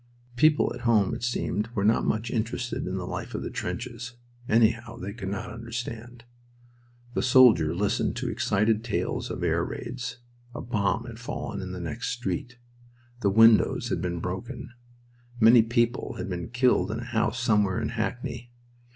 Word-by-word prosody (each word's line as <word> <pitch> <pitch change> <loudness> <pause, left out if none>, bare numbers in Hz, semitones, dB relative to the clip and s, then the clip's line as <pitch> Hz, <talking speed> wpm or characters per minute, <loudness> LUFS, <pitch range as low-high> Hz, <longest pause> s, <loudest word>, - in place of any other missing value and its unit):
People 155 +4 +4
at - - -8
home, 110 -5 +3
it - - -5
seemed, 115 -2 -1
were 100 - 0
not 110 +2 +3
much 110 +2 -1
interested 120 0 -2
in 95 +1 -2
the 90 - -4
life - - -5
of - - -3
the - - -5
trenches; 120 0 -5 0.4
anyhow, 115 +1 +2
they 100 -2 -6
could 100 -4 -5
not 100 +1 -4
understand. 115 +1 -6 0.9
The - - 0
soldier 120 -11 +6
listened 100 +3 0
to 125 +1 -3
excited 110 -2 +1
tales 115 -3 -2
of - - -4
air - - +2
raids. 125 0 -5 0.4
A - - -4
bomb 115 -1 0
had 115 -2 -9
fallen 115 -3 -5
in 95 -1 -6
the 90 - -6
next 115 +8 -4
street. 120 0 -3 0.6
The 100 - +2
windows 110 +2 +5
had 85 - -1
been 85 -1 -2
broken. 85 - -5 0.7
Many 115 +1 +8
people 120 +1 0
had - - -5
been 90 +1 -4
killed 120 -6 +2
in 110 +2 -3
a - - -5
house 115 0 -1
somewhere 105 -5 +2
in - - -2
Hackney. 120 +1 -4
115 Hz, 170 wpm, -27 LUFS, 100-120 Hz, 0.9 s, Many